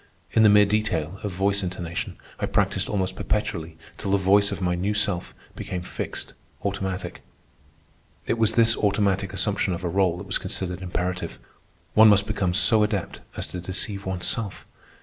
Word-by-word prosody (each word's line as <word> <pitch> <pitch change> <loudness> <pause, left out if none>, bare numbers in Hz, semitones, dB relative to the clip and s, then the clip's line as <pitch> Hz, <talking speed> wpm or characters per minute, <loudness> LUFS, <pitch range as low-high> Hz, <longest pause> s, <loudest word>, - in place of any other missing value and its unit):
In 110 - +4
the 110 - +7
mere 105 0 +7
detail 100 -5 -1
of 105 -2 -3
voice 100 +2 +1
intonation 90 -2 -4 0.2
I - - -1
practised - - +1
almost 95 -2 -1
perpetually 85 -7 -2 0.2
till 100 - -3
the 100 - +4
voice 100 +1 +4
of 100 - -4
my 90 -2 0
new 95 +4 -1
self 100 -4 -1 0.2
became 95 -4 -5
fixed, - - -6 0.3
automatic. 95 -2 -3 1.0
It 115 - -1
was 110 -2 +3
this 115 -1 +5
automatic 100 -2 +1
assumption 95 -1 0
of 90 - -8
a 85 - -1
rôle 95 -2 +2
that 95 - -7
was 95 - 0
considered 90 -1 -4
imperative. 90 0 -3 0.6
One 110 +1 +8
must 100 -1 +5
become 95 -4 -1
so 110 +2 +5
adept 105 -3 -1 0.2
as - - -1
to 90 - -5
deceive 95 +2 -2
oneself. 95 +3 -2
95 Hz, 170 wpm, -25 LUFS, 90-105 Hz, 1.0 s, One